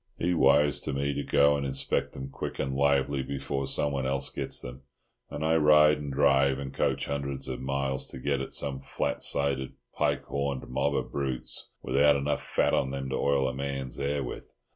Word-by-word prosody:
He 90 +2 +1
wires 75 -3 +4
to - - -4
me 70 +1 -1
to 70 - -2
go 70 0 +4
and 70 - -2
inspect 65 0 -1
them 65 +1 -7
quick 70 - -5
and 65 0 -2
lively 70 0 +2
before 70 0 -3
someone 70 -1 +1
else 70 0 -1
gets - - -1
them, 65 +2 -7 0.5
and 80 - -4
I 80 +1 +3
ride 75 0 +6
and 70 -1 -5
drive 70 -1 +3
and 70 -1 -6
coach - - 0
hundreds 70 -1 -3
of 65 - -4
miles 65 0 -1
to - - -8
get 70 +1 -1
at 70 - -5
some 70 -2 -1
flat 65 - -3
sided 70 -2 -1 0.2
pike - - 0
horned 70 -1 -3
mob 70 +3 0
of - - -2
brutes 65 -3 -4
without 70 +3 +4
enough 70 +1 -1
fat - - +1
on 65 - +2
them 70 0 -4
to - - 0
oil 70 -1 +2
a 65 - -2
man's 70 -2 -4
hair 70 0 -1
with. - - -6
70 Hz, 200 wpm, -28 LUFS, 65-70 Hz, 0.5 s, ride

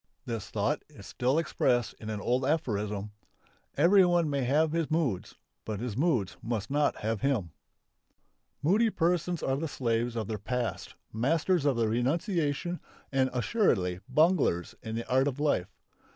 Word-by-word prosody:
This 115 -3 -4
thought - - 0
is - - -13
still 130 +4 0
expressed 125 -6 +1
in 110 - -7
an 105 -1 -3
old 125 +5 0
aphorism. 105 -8 -1 0.7
"Everyone 175 -1 +5
may 140 -1 0
have 150 +5 +2
his 165 -1 -1
moods; 155 - -1 0.3
but 105 -2 -4
his 120 -2 -4
moods 130 - +1
must 115 0 -3
not 145 +1 +1
have 110 -1 -1
him." 115 - 0 1.1
Moody 210 +9 +4
persons 175 -2 0
are 135 0 +1
the 160 +3 -2
slaves 120 -3 -1
of 110 -3 -2
their 110 -2 -3
past, 125 +3 -3 0.2
masters 155 - +1
of 140 -4 +2
renunciation 145 - 0 0.3
and 135 -1 +2
assuredly 120 - +1
bunglers 155 - +2
in 110 0 -5
the 115 - -4
art 130 +2 +3
of 140 0 -3
life. 145 -12 +1
130 Hz, 150 wpm, -29 LUFS, 115-160 Hz, 1.1 s, Everyone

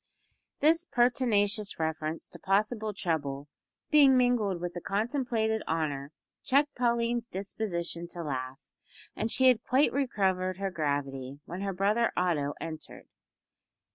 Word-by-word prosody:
This 325 +3 +4
pertinacious 215 - +1
reference 160 0 -3
to - - -12
possible 215 +3 0
trouble 145 -7 -2 0.4
being 280 -4 +7
mingled 235 -7 +2
with 175 0 -4
the 175 - -6
contemplated 220 - 0
honour 145 -3 -2 0.3
checked 285 +2 +3
Pauline's 235 -1 0
disposition 180 -4 -3
to 170 0 -6
laugh, 130 -3 -4 0.6
and 220 - -1
she 260 +3 +4
had 245 -3 +4
quite 265 +4 +3
recovered 190 -9 0
her 195 0 -2
gravity 140 -4 -3
when 180 +3 -6
her 200 0 -1
brother 205 +5 +1
Otto 150 -6 0
entered. 160 -1 -8
195 Hz, 125 wpm, -29 LUFS, 165-235 Hz, 0.6 s, being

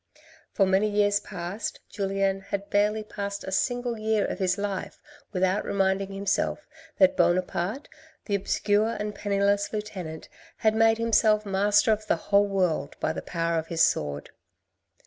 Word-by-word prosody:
For 195 - +3
many 190 +3 +2
years 205 0 +2
past 190 +1 -5
Julien 195 -1 -1
had 200 0 -4
scarcely 210 +1 +2
passed 200 -1 -5
a 190 - -6
single 245 +2 -1
year 215 -1 +1
of - - -4
his 185 0 +1
life 200 -2 -4 0.3
without 190 +1 +1
reminding 195 0 0
himself 200 +9 -1 0.3
that 190 -1 +5
Buonaparte, 180 - 0 0.4
the 205 - -3
obscure 205 +3 +1
and 210 0 -3
penniless 200 0 0
lieutenant, 185 -7 -6 0.3
had 220 -1 +2
made 225 0 +4
himself 220 -2 +3
master 205 +3 +3
of 215 0 -1
the - - +3
whole 200 +4 +2
world 185 -5 0
by 160 - 0
the - - -5
power 165 -1 -1
of 160 - -6
his 165 -1 +2
sword. 75 -1 0
200 Hz, 150 wpm, -26 LUFS, 190-210 Hz, 0.4 s, that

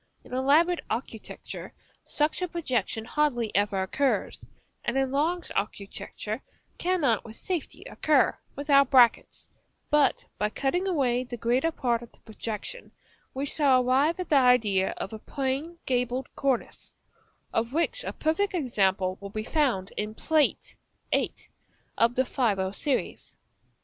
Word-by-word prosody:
In - - -13
elaborate 300 +7 +3
architecture 225 -1 -6 0.3
such 300 +4 0
a 360 - 0
projection 255 -9 -2
hardly 240 -5 0
ever 200 -1 +2
occurs, 270 +8 -1 0.4
and 255 - -1
in 270 -1 +1
large 325 +5 0
architecture 210 +3 -4 0.4
cannot 330 - +1
with 225 -1 -10
safety 355 +2 -4
occur, 300 -4 +2 0.2
without 280 -1 +4
brackets; 250 -4 +4 0.4
but 295 -1 +3
by 210 - +1
cutting 350 - -1
away 255 -8 +1
the 245 -1 -7
greater 250 +8 +1
part 240 -6 0
of 240 - -12
the - - -23
projection, 220 - -6 0.4
we 270 +2 -1
shall 270 -3 +3
arrive 280 +8 +3
at 365 - -4
the 300 - +4
idea 220 -7 +4
of 195 - -5
a 220 - -6
plain 275 +8 -3
gabled 250 0 -1
cornice, 270 -3 -2 0.6
of 230 +1 0
which 335 - 0
a - - -3
perfect 365 +6 0
example 195 - +1
will 200 - -6
be 215 +2 -4
found 240 - 0
in 210 +1 -3
Plate 310 +2 +1 0.4
VII. - - +2 0.6
of 230 +1 +3
the 260 - +2
folio 200 -8 0
series. 265 +6 -2
260 Hz, 140 wpm, -27 LUFS, 225-300 Hz, 0.6 s, without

